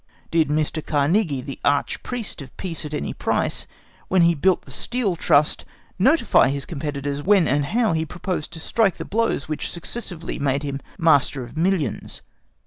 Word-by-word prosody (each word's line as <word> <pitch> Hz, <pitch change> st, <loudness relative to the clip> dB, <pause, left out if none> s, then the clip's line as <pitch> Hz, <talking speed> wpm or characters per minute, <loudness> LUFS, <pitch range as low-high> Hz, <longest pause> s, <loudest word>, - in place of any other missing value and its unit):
Did 165 Hz, -1 st, +3 dB
Mr. 155 Hz, +1 st, 0 dB
Carnegie, 150 Hz, 0 st, +1 dB
the 135 Hz, +1 st, -7 dB
arch 145 Hz, 0 st, +1 dB
priest 240 Hz, -10 st, -5 dB
of 135 Hz, -, -12 dB
Peace 170 Hz, -5 st, -4 dB
at 150 Hz, -, -6 dB
any -, -, -3 dB
price, -, -, -1 dB, 0.4 s
when 185 Hz, -2 st, +4 dB
he 170 Hz, 0 st, +5 dB
built 180 Hz, +4 st, +2 dB
up -, -, -29 dB
the -, -, -12 dB
Steel 235 Hz, -7 st, -1 dB
Trust, 150 Hz, -2 st, +3 dB, 0.4 s
notify 265 Hz, -, +4 dB
his 140 Hz, 0 st, -2 dB
competitors 145 Hz, -2 st, -3 dB
when 190 Hz, -2 st, +4 dB
and 145 Hz, +1 st, +2 dB
how 220 Hz, +1 st, +2 dB
he 160 Hz, 0 st, +1 dB
proposed 175 Hz, -1 st, -4 dB
to 160 Hz, -, -7 dB
strike 200 Hz, +2 st, +1 dB
the -, -, -5 dB
blows 230 Hz, -7 st, 0 dB
which 155 Hz, -1 st, -3 dB
successively 170 Hz, -1 st, -6 dB
made 140 Hz, 0 st, 0 dB
him 140 Hz, -1 st, -3 dB, 0.2 s
master 145 Hz, -6 st, +3 dB
of 120 Hz, -, -11 dB
millions? 165 Hz, -, -1 dB
160 Hz, 175 wpm, -23 LUFS, 145-190 Hz, 0.4 s, he